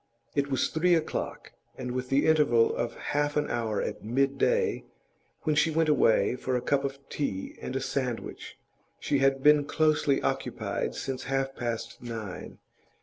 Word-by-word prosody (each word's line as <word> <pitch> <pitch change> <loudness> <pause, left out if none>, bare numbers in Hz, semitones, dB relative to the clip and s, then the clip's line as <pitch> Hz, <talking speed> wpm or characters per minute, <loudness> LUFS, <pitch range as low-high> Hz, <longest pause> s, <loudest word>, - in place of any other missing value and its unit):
It 140 -1 0
was 135 - +1
three 175 +2 +3
o'clock, 160 - -3 0.3
and 125 -1 -4
with 125 0 -3
the 135 +1 +3
interval 145 -8 +4
of 120 - -2
half 145 0 -1
an 150 - +1
hour 115 -3 -1
at - - -5
midday, 140 - +1 0.6
when 155 -2 +1
she 150 +2 +4
went 160 0 +2
away 125 -4 +3
for 130 0 -2
a - - +2
cup 140 +2 +1
of 140 0 -3
tea 95 -10 -3
and 130 - -5
a 135 - 0
sandwich, 125 -4 -4 0.4
she 140 - 0
had 135 0 +2
been 150 0 +6
closely 150 -2 +2
occupied - - -2
since 135 -1 -4
half 135 0 -1
past 115 -1 -4
nine. 115 -5 -6
135 Hz, 160 wpm, -28 LUFS, 125-150 Hz, 0.6 s, been